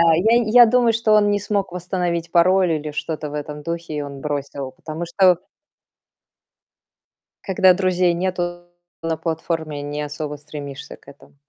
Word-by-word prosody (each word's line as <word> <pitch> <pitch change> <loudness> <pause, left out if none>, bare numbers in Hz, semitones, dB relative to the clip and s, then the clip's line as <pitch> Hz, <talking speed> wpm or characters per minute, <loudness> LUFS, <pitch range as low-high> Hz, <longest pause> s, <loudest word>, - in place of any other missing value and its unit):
я 225 +8 +4 0.2
я - - +7
думаю, 240 0 +3
что 225 -1 0
он 210 -1 +5
не 205 0 +1
смог 200 -2 -2
восстановить 175 -2 -3
пароль 180 +1 +4
или 155 -1 -2
что-то 155 0 -4
в 150 - -7
этом 150 0 -6
духе, 170 0 -5
и 150 - -2
он 140 -1 -7
бросил, 140 -2 -4
потому 165 -1 -6
что 180 +1 +4 2.1
когда 190 -1 +4
друзей 180 -1 +2
нету 175 -1 -3 0.3
на 165 -1 -2
платформе, 160 -2 -3
не 145 +1 -4
особо 150 0 -5
стремишься 145 -1 -9
к - - -28
этому. 140 0 -16
170 Hz, 150 wpm, -21 LUFS, 150-185 Hz, 2.1 s, я